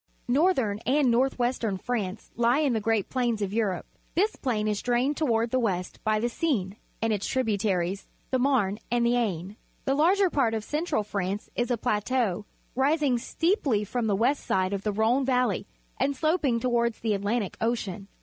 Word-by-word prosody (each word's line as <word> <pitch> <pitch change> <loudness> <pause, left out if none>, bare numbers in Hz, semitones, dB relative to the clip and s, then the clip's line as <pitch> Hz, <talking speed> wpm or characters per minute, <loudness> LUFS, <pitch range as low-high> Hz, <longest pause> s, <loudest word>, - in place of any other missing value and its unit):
— - - -38
Northern 260 - +2
and 265 +1 +2
north 260 +3 +2
western 240 -5 0
France 210 -2 -4
lie 240 +2 +3
in 290 -4 +2
the 220 - 0
great 220 -2 +1
plain 245 -3 0
of 195 0 -3
Europe. 210 -5 0 0.3
This 415 +6 +2
plain 220 -5 -1
is 210 -1 -1
drained 250 +4 +1
toward 230 -6 +1
the 255 - +2
west 185 -6 -2
by 215 0 +2
the 235 - 0
Seine, 230 - -1 0.2
and 225 -1 +2
its 200 -1 -2
tributaries, 200 -6 0 0.2
the 260 - +2
Marne 240 -7 +2
and 240 0 +2
the 235 - +3
Aisne. 200 -4 -2 0.3
The 270 - +2
larger 360 +6 +3
part 235 -6 +2
of 220 - -3
Central 300 -4 -1
France 200 0 -3
is 240 +1 0
a 245 - +1
plateau, 215 -3 0 0.3
rising 275 -1 +2
steeply 290 - 0
from 230 +2 -2
the 205 - +2
west 245 +8 +1
side 185 +1 0
of 200 - -2
the 210 - -1
Rhone 230 +6 +2
^'alley 250 -7 +1 0.3
and 275 +1 +1
sloping 295 -5 +1
toward 235 -2 +1
the 220 -2 -1
Atlantic 205 +1 -1
Ocean. 220 -4 -2
235 Hz, 185 wpm, -27 LUFS, 210-260 Hz, 0.3 s, lie